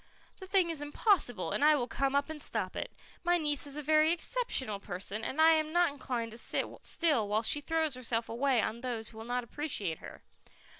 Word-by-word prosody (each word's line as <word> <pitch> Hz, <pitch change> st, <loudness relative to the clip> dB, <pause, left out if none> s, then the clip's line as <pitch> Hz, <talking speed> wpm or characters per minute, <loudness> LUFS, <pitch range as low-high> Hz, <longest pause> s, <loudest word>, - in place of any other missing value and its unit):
The 380 Hz, -, -9 dB
thing 370 Hz, -3 st, +3 dB
is 310 Hz, -3 st, -4 dB
impossible, 290 Hz, -, +1 dB
and -, -, 0 dB
I 305 Hz, 0 st, +7 dB
will 245 Hz, -4 st, -1 dB
come 275 Hz, +1 st, 0 dB
up 280 Hz, 0 st, +2 dB
and 315 Hz, -2 st, -7 dB
stop -, -, -3 dB
it. -, -, -4 dB, 0.3 s
My 350 Hz, 0 st, +4 dB
niece 295 Hz, -3 st, -1 dB
is 285 Hz, +1 st, -7 dB
a 300 Hz, -, -4 dB
very 310 Hz, +2 st, +4 dB
exceptional 340 Hz, -, -1 dB
person, 200 Hz, +2 st, -4 dB
and 275 Hz, -, -3 dB
I 320 Hz, +1 st, +8 dB
am 310 Hz, -1 st, +2 dB
not 345 Hz, -1 st, +3 dB
inclined 245 Hz, -5 st, -3 dB
to 230 Hz, -, -7 dB
sit -, -, -1 dB, 0.2 s
still 295 Hz, -11 st, +1 dB
while 215 Hz, +2 st, +1 dB
she 295 Hz, +6 st, +3 dB
throws 320 Hz, -1 st, 0 dB
herself 235 Hz, -2 st, -2 dB
away 250 Hz, 0 st, +1 dB
on 230 Hz, +2 st, -3 dB
those 235 Hz, -4 st, -3 dB
who 220 Hz, -, -12 dB
will 225 Hz, -, -7 dB
not 245 Hz, +1 st, -1 dB
appreciate 230 Hz, -, -3 dB
her." -, -, -11 dB
280 Hz, 215 wpm, -32 LUFS, 230-315 Hz, 0.3 s, I